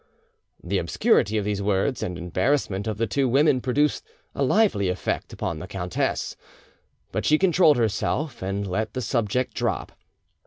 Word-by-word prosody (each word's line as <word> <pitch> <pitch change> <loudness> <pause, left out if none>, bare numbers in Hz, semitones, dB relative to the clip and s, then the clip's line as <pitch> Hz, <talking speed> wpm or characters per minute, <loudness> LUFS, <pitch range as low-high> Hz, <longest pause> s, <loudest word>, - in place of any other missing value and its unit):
The 95 +3 0
obscurity 100 +5 +2
of 105 - -1
these 105 -1 -1
words 100 +6 0
and 90 -1 -3
embarrassment 95 - 0
of 110 -2 -2
the 115 - +1
two 135 +1 0
women 140 0 +3
produced 145 +4 +1 0.3
a - - -4
lively 145 - +3
effect 90 0 -3
upon 80 - -4
the 90 - -7
countess; 90 -2 -2 0.8
but - - -2
she 155 - +4
controlled 175 -4 +4
herself 120 +5 -1
and 100 +2 -2
let 110 +5 -3
the 130 - -1
subject 120 +1 -1
drop. 120 -4 -2
110 Hz, 155 wpm, -24 LUFS, 95-135 Hz, 0.8 s, she